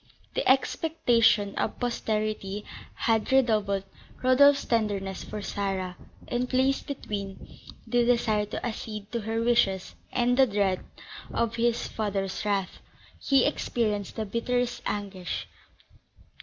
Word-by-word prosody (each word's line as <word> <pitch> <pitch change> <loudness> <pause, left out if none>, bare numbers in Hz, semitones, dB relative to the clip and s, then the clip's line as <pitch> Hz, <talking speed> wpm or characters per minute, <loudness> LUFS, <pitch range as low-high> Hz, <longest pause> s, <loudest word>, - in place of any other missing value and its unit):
The - - 0
expectation 240 -7 +3
of - - -1
posterity 215 -4 -2 0.3
had 225 0 +1
redoubled 215 -7 +3 0.4
Rodolph's 280 +2 +6
tenderness 205 -4 -1
for 210 -1 -6
Sarah, 190 -3 -2 0.3
and, 245 +1 -1
placed 265 +2 +1
between 200 -8 -5 0.4
the 245 -1 +2
desire 225 -3 +2
to 210 - -5
accede 215 -3 -5
to 235 - -2
her 225 +2 -1
wishes 195 -6 +2 0.2
and 245 0 +2
the 265 -1 +6
dread 200 -3 0 0.5
of 230 0 -1
his 235 0 +1
father's 195 -3 -2
wrath, 200 -3 -1 0.4
he 270 -2 +4
experienced 215 -8 -1
the 220 - -2
bitterest 245 +3 -1
anguish. 195 -3 -4
220 Hz, 115 wpm, -27 LUFS, 200-245 Hz, 0.5 s, Rodolph's